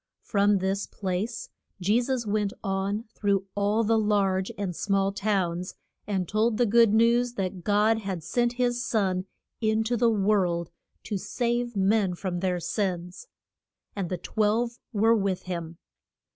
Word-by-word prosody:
From 205 -1 +3
this 195 +1 -1
place 200 +4 -3 0.3
Je 205 +6 +2
sus 250 -1 -2
went 210 -1 0
on 195 +2 -1
through 200 -2 0
all 205 +2 +1
the 225 +1 +3
large 195 -3 +1
and 195 -4 -3
small 195 +1 +1
towns, 190 -4 -1 0.3
and 190 -4 -1
told 215 +3 +1
the 245 - +3
good 230 0 +5
news 235 +2 +3
that 185 -4 -3
God 210 +3 +3
had 190 -6 -4
sent 240 +6 0
his 245 -1 0
Son 190 -6 0 0.3
in 220 -1 +1
to 240 +2 0
the 235 0 +3
world 195 -5 +1 0.3
to 205 - -3
save 240 +2 -1
men 195 -1 +2
from 175 -1 -3
their 180 -1 0
sins. 180 - -3 0.7
And 195 -4 -3
the 180 - -2
twelve 225 +5 0
were 225 +1 +4
with 195 -3 -1
him. 170 -2 -5
205 Hz, 150 wpm, -27 LUFS, 190-225 Hz, 0.7 s, good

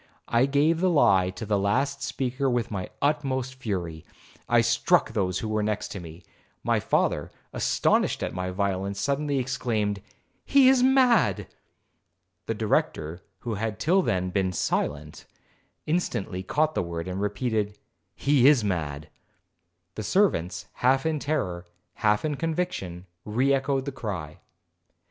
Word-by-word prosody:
I 120 +3 +3
gave 150 +4 +2
the 185 +1 +3
lie 95 - +4
to 95 +4 -6
the 105 -1 +1
last 135 +8 0
speaker 130 +1 -1
with 120 -2 0
the 95 -4 -4
utmost 135 -3 0
fury,—I 90 -10 -3
struck - - +2
those 95 -4 0
who 110 - -3
were 110 0 0
next 105 0 -2
me. 85 +1 -11 0.4
My - - +2
father, - - 0 0.2
astonished - - +1
at - - -3
my 90 0 -3
violence, 100 +1 -2
suddenly 140 +3 0
exclaimed, 115 -6 -1 0.4
'He 275 -2 +5
is 265 -1 +4
mad.' 250 - +4 1.0
The 115 - -1
Director, 85 -6 -1 0.2
who 115 - -3
had 110 0 -3
till 180 +10 +3
then 90 - -1
been 95 -1 0
silent, 75 -2 -2 0.6
instantly 130 - -1
caught 155 +11 0
the - - 0
word, 85 0 -5
and 95 +1 -3
repeated, 105 -1 -1 0.4
'He 140 -2 +4
is 140 -6 +5
mad.' 80 -6 -2 0.9
The 110 - -5
servants, 100 - +1
half 135 +3 +2
in 160 -2 0
terror, 90 - -2 0.3
half 105 +5 +2
in 150 -2 -1
conviction, 160 - -3 0.2
re 125 +6 +1
echoed 135 0 0
the 140 - -3
cry. 95 - -6
110 Hz, 140 wpm, -26 LUFS, 95-140 Hz, 1.0 s, He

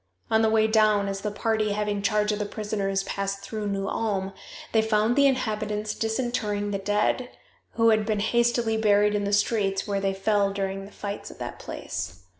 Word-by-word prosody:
On 220 0 +4
the 220 - +3
way 220 0 +4
down, 215 -2 +3
as 195 0 -3
the 210 - -1
party 215 0 0
having 205 -1 -1
charge 210 +1 +2
of 210 - -2
the 210 - -1
prisoners 200 -2 -2
passed 195 0 -3
through 215 0 -4
New 195 -1 -2
Ulm 195 -3 -1 0.4
they 220 - +4
found 220 +1 +2
the 280 0 +6
inhabitants 215 -4 -1
disinterring 220 -3 -1
the 195 - -1
dead, 210 +5 0 0.4
who 230 0 +4
had 215 -1 +3
been 210 -1 -1
hastily 235 +1 +2
buried 210 -1 +3
in 205 -1 0
the 200 - -1
streets 205 -1 +1
where 200 -1 -1
they 195 0 0
fell 200 0 +2
during 195 0 -3
the 200 - -13
fights 205 0 -6
at - - -12
that - - -6
place. 90 +1 -6
210 Hz, 195 wpm, -26 LUFS, 200-220 Hz, 0.4 s, the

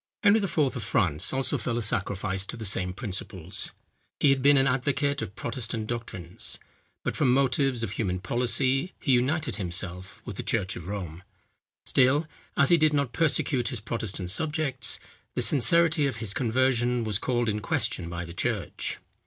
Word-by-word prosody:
Henry 210 +1 +6
IV. 190 -5 -2
of 135 -5 +2
France 90 -6 +1
also 135 -1 0
fell 120 -2 -2
a - - 0
sacrifice 100 -3 -1
to - - -5
the 110 - -6
same 95 -2 0
principles. 95 -4 -3 0.5
He 145 - +5
had 135 -1 +2
been 140 +1 +6
an 135 - +4
advocate 140 +2 0
of 95 - -6
Protestant 115 -1 -3
doctrines; 110 -7 -4 0.5
but - - -2
from 135 -4 +3
motives 135 -2 +2
of 105 - -2
human 95 -4 -1
policy 130 - +1
he 135 - 0
united 140 +5 +1
himself 90 -1 -4
with - - -7
the - - -2
church 100 -5 -1
of 85 - -8
Rome. 90 -4 -5 0.6
Still, 135 +5 +3 0.3
as 140 - +4
he 170 - +6
did 155 -1 +3
not 140 -4 0
persecute 140 -5 +1
his 125 -4 -3
Protestant 105 -5 -3
subjects, 150 - 0 0.4
the - - +3
sincerity 160 +2 +4
of 135 - -3
his 110 -3 -2
conversion 125 0 +1
was 105 -2 +2
called 120 -2 0
in 105 -1 0
question 85 -4 -1
by 85 0 -4
the 85 - -9
church. 90 - -2
120 Hz, 170 wpm, -27 LUFS, 100-135 Hz, 0.6 s, Henry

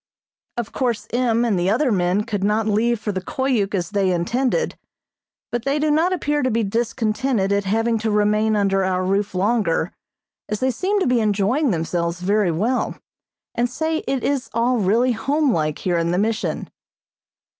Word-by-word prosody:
Of 235 -2 -3
course 235 -5 -1
M. 240 -1 +2
and 210 -6 +1
the 175 +2 +1
other 250 +5 +2
men 185 +1 +1
could 205 -3 -3
not 210 +2 +1
leave 220 +2 +1
for 210 - -3
the 190 -1 -3
Koyuk 220 -2 -1
as 180 +1 -2
they 195 -2 +1
intended, 245 - 0 0.8
but 240 -1 -2
they 275 +3 0
do 300 0 +1
not 325 +5 +2
appear 295 -5 0
to 255 - +1
be 230 -1 +1
discontented 225 0 0
at 200 0 0
having 225 +3 +1
to 220 +1 -1
remain 210 +1 +2
under 195 -2 +2
our 185 0 0
roof 195 +1 0
longer, 195 -4 +1 0.6
as 210 - -2
they 260 0 +1
seem 395 - 0
to - - +2
be 250 -1 +3
enjoying 215 +7 +1
themselves 170 -1 -1
very 200 +1 +2
well, 215 +11 -1 0.6
and 240 +1 0
say 315 +5 -1
it 270 -2 -1
is 275 -3 -1
all 240 +2 +2
really 225 +6 +2
home 275 +4 +1
like 155 -3 -1
here 175 -2 0
in 165 0 0
the 175 - +1
Mission. 210 -4 -1
220 Hz, 180 wpm, -21 LUFS, 195-250 Hz, 0.8 s, be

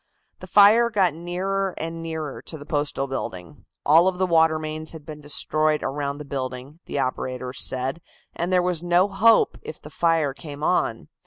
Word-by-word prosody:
The - - -10
fire 215 +3 +6
got 190 -7 +2
nearer 185 +3 -2
and 165 +1 -5
nearer 160 -3 -5
to 160 - -8
the 145 - -11
Postal 145 -3 -1
building. 90 -10 -6 0.2
All 165 +5 +6
of 185 -1 0
the 185 - +1
water 160 -2 +3
mains 155 +1 -5
had 155 -3 -11
been 150 -1 -9
destroyed 155 +1 +1
around 140 +1 -3
the 150 - -8
building, 130 +2 -5
the - - -4
operators 130 -1 -2
said, 130 +5 -1 0.3
and 170 +2 -2
there 180 -1 +3
was 180 -3 -1
no 175 +2 +3
hope 215 +3 +3
if 155 - -9
the 150 - -12
fire 165 -5 +1
came 145 +1 -9
on. 115 - 0
155 Hz, 180 wpm, -24 LUFS, 140-175 Hz, 0.3 s, fire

